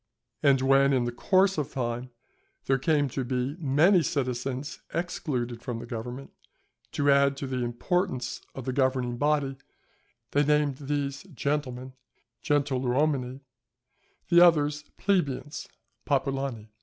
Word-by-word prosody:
And 140 -2 +4
when 135 +1 +4
in 125 -2 +1
course 190 +7 +2
of 145 - -4
time 120 0 -3 0.6
there 135 0 +2
came 145 +1 +2
to 130 +1 -3
be 125 +3 -2
many 165 +6 +4
citizens 130 -1 -3
excluded 135 -9 -2
from 120 -2 -4
the 115 - -7
government, 120 +3 -6 0.6
to 145 0 +3
add 140 0 +4
to 140 - -4
the 130 -2 -2
importance 125 +1 -1
of 130 - -7
the 130 - -2
governing 130 -2 +1
body, 145 -2 +1 0.7
they 145 - +3
named 150 -2 +2
these 140 -1 -3
"Gentlemen" 130 -2 -2 0.5
(gentiluomini), 135 -1 0 0.9
the 170 0 +7
others 150 -3 +4
"Plebeians" 150 -7 -1 0.4
(popolani). 135 -5 -1
135 Hz, 120 wpm, -27 LUFS, 125-145 Hz, 0.9 s, the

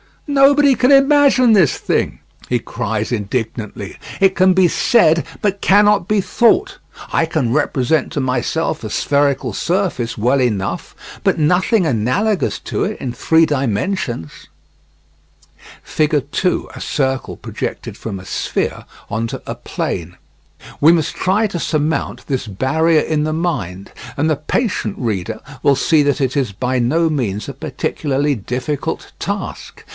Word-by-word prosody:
"Nobody 280 -1 +4
can 255 +2 +3
imagine 275 -3 +5
this 185 -9 +4
thing," - - -1 0.3
he 125 - +1
cries 110 -2 -3
indignantly. 110 -3 -4 0.2
"It 195 -1 +5
can 185 0 +4
be 185 -1 +4
said, 165 -7 +3 0.2
but 200 -1 0
cannot 205 -1 +4
be 210 -1 +2
thought. 375 - +2 0.3
I 165 - +2
can 155 -7 -1
represent 130 +3 0
to 145 - -1
myself 130 +5 -1
a - - -4
spherical 140 +1 +1
surface 175 -11 -1
well 125 +6 +2
enough, 105 -6 -2 0.3
but - - +2
nothing 180 +6 +2
analogous 160 - 0
to - - -2
it - - -4
in 130 - -3
three 160 +5 +3
dimensions." 130 - -2 1.5
[Figure 155 -1 +1
2: 145 +7 -1
A - - -8
circle 135 -2 -1
projected - - -6
from 105 -4 -5
a 95 - -11
sphere - - -2 0.2
onto 115 +1 -3
a - - -4
plane] 85 0 -4 0.6
We 160 +3 +6
must 160 -4 0
try 200 +4 +1
to 180 -4 -4
surmount 155 0 -1
this 135 -4 -2
barrier 155 - +2
in 150 -1 0
the 155 - -1
mind, 100 - -3 0.3
and 150 +3 +1
the 155 - +1
patient 195 - -1
reader 105 -8 -3 0.2
will 140 -1 +4
see 155 +3 +3
that 145 -1 0
it 135 +1 0
is 125 -7 0
by 125 +5 -1
no 160 +8 +2
means 110 -9 -2
a - - -5
particularly 145 0 -2
difficult 130 +5 -4
task. - - -5
150 Hz, 140 wpm, -18 LUFS, 125-185 Hz, 1.5 s, We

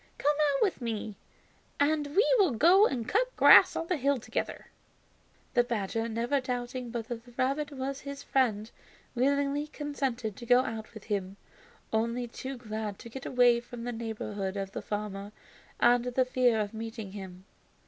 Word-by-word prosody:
Come 295 +1 +2
out 285 -2 +3
with 390 -9 0
me, 220 -3 -4 0.6
and 290 0 +1
we 420 +5 +5
will 370 -10 +4
go 355 - +6
and 240 -4 -3
cut - - +1
grass - - +8
on - - -2
the 360 0 -1
hills 280 -2 +1
together." - - -4 0.9
The 245 - +4
badger, 225 -1 -2
never 235 +5 0
doubting 250 0 -4
but 230 -1 -4
that 235 -1 -5
the 245 0 -17
rabbit 280 +3 0
was 275 0 -4
his 280 0 -7
friend, 225 -4 0 0.4
willingly 280 +3 +1
consented 270 -8 -3
to 240 - -8
go 245 +1 +6
out 225 -3 -6
with 220 - -9
him, 200 -2 -3 0.6
only 235 +2 0
too 260 +3 -7
glad 215 -3 -5
to 235 - -11
get 265 +3 -7
away 245 -1 +4
from 240 0 -9
the 245 - -3
neighborhood 210 -4 -4
of 195 -1 -4
the - - -5
farmer 205 -1 -5 0.5
and 240 0 +5
the 250 +1 +1
fear 250 -3 +2
of 210 0 -2
meeting 225 -2 -6
him. 190 -2 -9
245 Hz, 170 wpm, -29 LUFS, 220-275 Hz, 0.9 s, grass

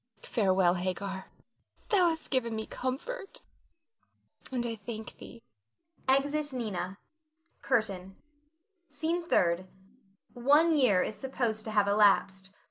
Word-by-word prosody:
Farewell, 190 -5 +2
Hagar, 190 +1 -4 0.6
thou 370 -5 +4
hast 320 -1 -4
given 235 -4 0
me 220 0 -3
comfort 395 - -5 1.1
and 245 -2 -1
I 235 - -2
thank 220 +1 -8
thee. 235 - -12 0.6
[Exit 285 +3 +2
Nina. 200 -6 -3 0.6
CURTAIN. 195 -7 -1 0.7
SCENE 335 +2 -2
THIRD. 175 - +2 0.7
[_One 295 +7 +4
year 225 -11 +4
is - - -3
supposed 240 -5 -2
to 220 - -4
have 205 -1 +4
elapsed. 195 -2 +3
230 Hz, 110 wpm, -30 LUFS, 195-275 Hz, 1.1 s, thou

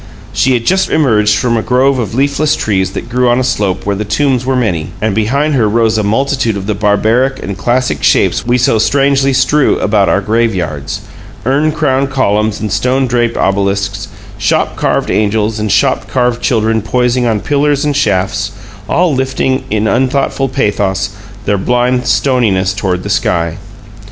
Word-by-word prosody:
She 130 - +2
had 115 -1 -2
just 190 +1 +2
emerged 105 -8 +2
from 120 0 0
a 115 - 0
grove 130 +3 +1
of 110 -2 -3
leafless 140 +3 +1
trees 95 -9 -1
that - - -5
grew 125 +1 +1
on 120 +1 +2
a - - 0
slope 100 -7 -1
where 100 0 0
the 105 - -3
tombs 130 +4 0
were 130 - +1
many; 95 -11 -1
and 110 0 -1
behind 135 +9 0
her 115 -6 +2
rose 110 0 +1
a - - 0
multitude 120 +1 0
of 95 - -5
the 105 - -1
barbaric 110 +6 +1
and 100 +2 -4
classic 125 +6 -1
shapes - - +2
we 120 +1 +1
so 120 -2 +2
strangely 135 +2 +2
strew 135 +2 +2
about 100 -1 +1
our - - +2
graveyards: 95 -10 -2 0.4
urn 145 +5 +1
crowned 140 -3 0
columns 110 -5 0
and 110 - -4
stone 125 +5 +1
draped 120 -1 0
obelisks, 100 0 -1 0.3
shop - - 0
carved - - -1
angels 110 +1 0
and 105 -1 -1
shop - - +1
carved 125 -2 0
children 110 -2 +1
poising 125 +3 0
on 110 -2 0
pillars 145 - 0
and 145 -1 0
shafts, 100 -4 0 0.4
all 175 -3 +2
lifting 130 0 -1
in 105 +1 0
unthought 130 +4 +1 0.2
pathos 100 -5 -1 0.3
their 100 -1 0
blind 125 +3 0
stoniness 105 -8 +1
toward 95 -2 -2
the - - -5
sky. 85 -4 -1
115 Hz, 170 wpm, -13 LUFS, 105-130 Hz, 0.4 s, She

